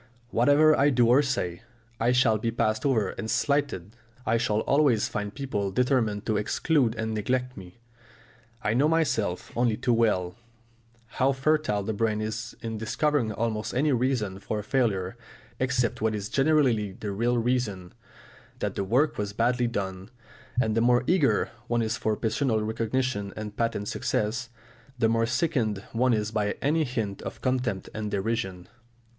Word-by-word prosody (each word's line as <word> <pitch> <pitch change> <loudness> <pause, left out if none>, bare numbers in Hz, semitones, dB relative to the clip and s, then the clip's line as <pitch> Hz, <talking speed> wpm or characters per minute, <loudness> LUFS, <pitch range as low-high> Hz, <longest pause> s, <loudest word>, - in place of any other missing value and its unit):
"Whatever 145 +6 +5
I 140 +1 +4
do 125 -3 +3
or 130 +4 +6
say, 90 -12 -2 0.4
I 115 +2 +3
shall 125 -4 +3
be 115 - -1
passed 110 +2 0
over 115 -7 +2
and 110 - -5
slighted, 120 - 0 0.3
I 115 - +2
shall 110 -2 +1
always 135 -6 +3
find 105 -1 -4
people 105 -6 -3
determined 115 -2 +1
to 110 -2 +1
exclude 120 +3 +1
and 110 0 -2
neglect 125 +4 -1
me!" 90 0 -11 0.9
I 105 +1 +1
know 135 +6 +3
myself, 130 - 0
only 120 -2 +1
too 125 - +1
well, 105 -6 +1 0.7
how 130 +4 +1
fertile 135 -6 +1
the 110 - -2
brain 110 0 0
is 110 +1 -4
in 110 -1 -4
discovering 125 +2 0
almost 110 +1 -2
any 145 +4 +2
reason 120 -7 0
for 105 +2 -3
a 105 - -4
failure 105 -4 0 0.4
except 125 -3 0
what 110 0 +1
is 105 0 -4
generally 135 -9 +2
the 105 +1 -5
real 120 +5 +1
reason, 115 -7 -1 0.6
that - - -2
the - - -2
work 125 +10 +1
was 100 -1 -2
badly 120 +2 +1
done. 95 -3 -4 0.5
And 110 -3 +1
the 115 - +2
more 120 +1 +4
eager 145 - +2 0.2
one 120 -1 +1
is 110 +1 -1
for 110 -1 0
personal 110 +1 0
recognition 110 -1 -1
and 105 -1 -6
patent 115 -3 -1
success, 115 +5 -1 0.5
the 115 -2 +2
more 115 0 +2
sickened 120 - 0
one 120 +1 +3
is 105 0 -2
by 105 -2 0
any 155 +3 +1
hint 110 -6 -3
of - - -7
contempt 125 -6 -1
and 110 -1 -3
derision. 95 -3 -2
115 Hz, 160 wpm, -27 LUFS, 105-130 Hz, 0.9 s, or